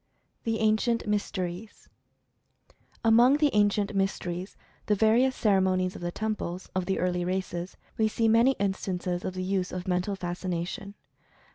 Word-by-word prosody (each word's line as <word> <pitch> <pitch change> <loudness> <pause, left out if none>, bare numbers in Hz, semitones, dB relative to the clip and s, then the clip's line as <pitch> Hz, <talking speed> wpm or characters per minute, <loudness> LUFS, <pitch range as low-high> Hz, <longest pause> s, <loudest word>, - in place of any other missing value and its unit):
THE 225 -1 0
ANCIENT 220 +2 +2
MYSTERIES. 205 -1 -3 1.2
Among 240 +5 +6
the 295 -2 +3
Ancient 205 -1 +2
Mysteries, 190 -1 -2
and - - -32
the 210 - +3
various 230 +5 +3
cere 200 -3 +3
monies 185 -1 +1
of - - -8
the 175 0 -2
temples, 200 -4 -4
of 185 -1 -2
the 190 - 0
early 180 -1 0
races, 180 -1 -3 0.2
we 220 - +4
see 225 +1 +1
many 230 +4 +5
instances 185 -4 -2
of 185 - -4
the 185 - -3
use 185 -1 -1
of 185 +1 -5
Mental 180 +2 0
Fascination. 180 +2 -4
195 Hz, 150 wpm, -28 LUFS, 180-220 Hz, 1.2 s, Among